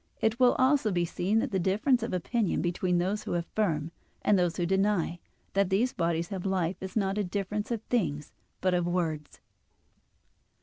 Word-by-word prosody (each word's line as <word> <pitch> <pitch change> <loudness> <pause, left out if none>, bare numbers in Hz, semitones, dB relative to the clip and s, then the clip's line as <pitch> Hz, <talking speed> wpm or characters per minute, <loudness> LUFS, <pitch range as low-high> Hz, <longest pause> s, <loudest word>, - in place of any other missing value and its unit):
It 220 +2 +1
will 250 -1 +6
also 260 -4 +3
be 175 -2 +1
seen 180 +5 0
that 255 +4 0
the 190 - +1
difference 215 +8 +2
of 230 - -3
opinion 195 +3 0
between 180 +1 0
those 190 +4 0
who - - -2
affirm, 170 -3 -1 0.3
and 210 - +4
those 175 -3 +1
who 175 - 0
deny, 190 -2 +1 0.3
that 195 -1 +2
these 220 +7 +2
bodies 170 -1 -1
have 190 -3 -4
life, 190 -2 0
is 190 0 -6
not 200 -1 0
a - - +1
difference 200 +2 -3
of 230 -3 -2
things 150 -13 -1 0.3
but 185 -1 +2
of 175 -1 +1
words. 160 -4 -2
190 Hz, 180 wpm, -29 LUFS, 175-210 Hz, 0.3 s, will